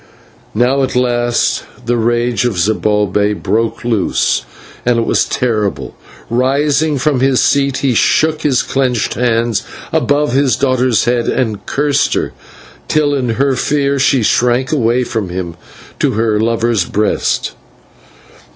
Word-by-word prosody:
Now 125 Hz, +5 st, +2 dB
at 130 Hz, -1 st, -1 dB
last 120 Hz, -1 st, +1 dB, 0.2 s
the 120 Hz, +1 st, +1 dB
rage 120 Hz, +1 st, 0 dB
of 115 Hz, -6 st, -1 dB
Zibalbay 105 Hz, +1 st, +1 dB
broke 110 Hz, +2 st, -2 dB
loose, 110 Hz, -6 st, 0 dB, 0.4 s
and 120 Hz, -1 st, +2 dB
it 115 Hz, -, +1 dB
was -, -, +2 dB
terrible. 110 Hz, -6 st, -2 dB, 0.3 s
Rising 140 Hz, +5 st, +1 dB
from 140 Hz, 0 st, 0 dB
his 130 Hz, 0 st, +2 dB
seat 140 Hz, -2 st, +2 dB
he 130 Hz, -, +2 dB
shook 155 Hz, +6 st, +2 dB
his 135 Hz, -4 st, +1 dB
clenched 125 Hz, -4 st, -1 dB
hands 115 Hz, -2 st, 0 dB, 0.3 s
above 145 Hz, -2 st, +1 dB
his 135 Hz, -2 st, +2 dB
daughter's 130 Hz, -3 st, +1 dB
head 120 Hz, -1 st, 0 dB
and 110 Hz, -5 st, -1 dB
cursed 145 Hz, 0 st, +1 dB
her, -, -, -2 dB, 0.5 s
till 150 Hz, -2 st, +1 dB
in 130 Hz, -4 st, -1 dB
her 135 Hz, +1 st, +1 dB
fear 140 Hz, +1 st, 0 dB
she 130 Hz, -2 st, +2 dB
shrank 125 Hz, +4 st, +1 dB
away 125 Hz, -4 st, +1 dB
from 110 Hz, -6 st, -3 dB
him 90 Hz, -2 st, -5 dB, 0.4 s
to -, -, +1 dB
her 110 Hz, -1 st, 0 dB
lover's 115 Hz, -3 st, +1 dB
breast. 105 Hz, 0 st, -1 dB
120 Hz, 135 wpm, -15 LUFS, 115-135 Hz, 0.5 s, Now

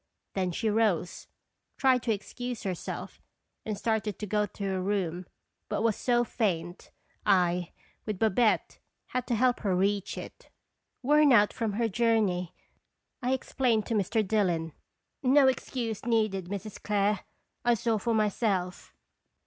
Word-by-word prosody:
Then 185 Hz, -2 st, 0 dB
she 220 Hz, +6 st, -2 dB
rose, 210 Hz, -6 st, 0 dB, 0.5 s
tried 260 Hz, -2 st, +4 dB
to 230 Hz, -, 0 dB
excuse 245 Hz, +3 st, -4 dB
herself, 185 Hz, -3 st, -5 dB, 0.4 s
and 215 Hz, -2 st, -3 dB
started 215 Hz, -2 st, -1 dB
to 210 Hz, -, -4 dB
go 210 Hz, +1 st, 0 dB
to 200 Hz, -, -8 dB
her 190 Hz, -1 st, -1 dB
room, 185 Hz, -3 st, -2 dB, 0.4 s
but 210 Hz, -, -1 dB
was 225 Hz, -3 st, +2 dB
so 240 Hz, -2 st, +2 dB
faint, 175 Hz, -7 st, -2 dB, 0.3 s
I, 180 Hz, -3 st, +2 dB, 0.4 s
with 210 Hz, -3 st, -2 dB
Babette, 220 Hz, +2 st, +2 dB, 0.3 s
had 255 Hz, -1 st, -2 dB
to 240 Hz, -, +1 dB
help 250 Hz, +2 st, +2 dB
her 195 Hz, -4 st, 0 dB
reach 195 Hz, +1 st, 0 dB
it. -, -, -9 dB, 0.3 s
" -, -, -53 dB
Worn 295 Hz, +2 st, +5 dB
out 210 Hz, -4 st, +5 dB
from 225 Hz, -3 st, -2 dB
her 230 Hz, +2 st, +1 dB
journey," 210 Hz, -5 st, +1 dB, 0.7 s
I 250 Hz, +1 st, +1 dB
explained 245 Hz, -4 st, 0 dB
to 235 Hz, -, -2 dB
Mr. 215 Hz, +1 st, +1 dB
Dillon. 175 Hz, -7 st, +1 dB, 0.5 s
"No 270 Hz, +1 st, +5 dB
excuse 235 Hz, -4 st, -2 dB
needed, 215 Hz, -5 st, +1 dB
Mrs. 200 Hz, +2 st, -6 dB
Clare; 205 Hz, -1 st, +1 dB, 0.4 s
I 240 Hz, 0 st, +4 dB
saw 225 Hz, -1 st, 0 dB
for 230 Hz, +3 st, 0 dB
myself." 200 Hz, -4 st, -1 dB
210 Hz, 145 wpm, -29 LUFS, 190-235 Hz, 0.7 s, Worn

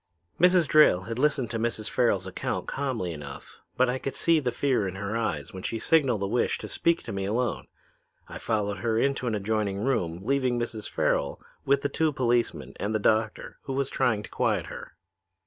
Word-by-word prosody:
"Mrs. 180 Hz, -1 st, +5 dB
Drayle 150 Hz, -12 st, +5 dB
had 115 Hz, +3 st, -4 dB
listened 135 Hz, -5 st, +1 dB
to 115 Hz, -, -2 dB
Mrs. 110 Hz, -1 st, -2 dB
Farrel's 110 Hz, -7 st, +1 dB
account 95 Hz, -, -3 dB
calmly 125 Hz, -11 st, -2 dB
enough, 70 Hz, -3 st, -10 dB, 0.2 s
but 130 Hz, -, +4 dB
I 125 Hz, +1 st, -1 dB
could 135 Hz, -, -4 dB
see 165 Hz, -1 st, +3 dB
the 125 Hz, -4 st, -1 dB
fear 125 Hz, -4 st, +1 dB
in 95 Hz, -, -5 dB
her 100 Hz, +2 st, -3 dB
eyes 90 Hz, -11 st, -2 dB
when 95 Hz, -, -7 dB
she 115 Hz, -, -2 dB
signaled 130 Hz, -7 st, +2 dB
a -, -, +1 dB
wish 120 Hz, +4 st, +1 dB
to -, -, -7 dB
speak 170 Hz, 0 st, +1 dB
to -, -, -6 dB
me 95 Hz, 0 st, -2 dB
alone. 115 Hz, +3 st, -1 dB, 0.6 s
I -, -, -8 dB
followed 105 Hz, -3 st, -1 dB
her 110 Hz, +3 st, 0 dB
into 135 Hz, 0 st, +1 dB
an 110 Hz, -, 0 dB
adjoining 105 Hz, -1 st, -1 dB
room, 90 Hz, -8 st, -1 dB
leaving 130 Hz, 0 st, +1 dB
Mrs. 115 Hz, -3 st, -4 dB
Farrel -, -, 0 dB, 0.3 s
with 140 Hz, 0 st, +2 dB
the -, -, +2 dB
two 155 Hz, +2 st, +1 dB
policemen 120 Hz, -3 st, 0 dB
and 105 Hz, +2 st, -2 dB
the -, -, +2 dB
doctor, 110 Hz, +1 st, 0 dB
who 135 Hz, -, -3 dB
was 135 Hz, 0 st, -1 dB
trying 110 Hz, -3 st, +1 dB
to -, -, -10 dB
quiet -, -, 0 dB
her. -, -, -9 dB
115 Hz, 200 wpm, -27 LUFS, 100-135 Hz, 0.6 s, Mrs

